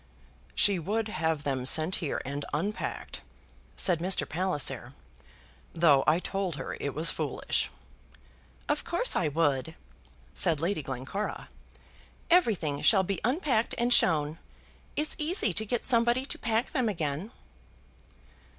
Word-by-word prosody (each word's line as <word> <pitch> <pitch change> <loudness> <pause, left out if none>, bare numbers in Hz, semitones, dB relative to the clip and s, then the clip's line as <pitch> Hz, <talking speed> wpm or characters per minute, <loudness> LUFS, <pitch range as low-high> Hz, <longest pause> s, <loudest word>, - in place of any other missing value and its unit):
"She 200 -3 +4
would 215 +6 -2
have 160 -5 -1
them 135 -3 -2
sent 155 +7 +2
here 155 -6 -3
and 140 +2 -4
unpacked," 205 +8 -4 0.5
said 180 -5 +4
Mr. 185 +3 +1
Palliser, 175 -2 -1 0.8
"though 150 -5 +4
I 155 +3 +4
told 190 -3 -3
her 135 - -5
it 140 - -4
was 160 +3 +2
foolish." 150 -4 -1 1.0
"Of 295 0 -1
course 345 +9 +1
I 175 - +1
would," 150 0 0 0.6
said 160 -3 +2
Lady 170 +1 -1
Glencora. 135 +10 -5 0.8
"Everything 195 - +2
shall 195 -4 +5
be 190 -1 -3
unpacked 250 - 0
and 240 +1 +3
shown. 155 -4 +4 0.6
It's 300 +1 -1
easy 305 - +2
to 220 +4 0
get 240 +2 -2
somebody 240 +1 +3
to - - -3
pack 225 +1 -1
them 255 -6 0
again." 160 0 -3
180 Hz, 130 wpm, -28 LUFS, 150-225 Hz, 1.0 s, shall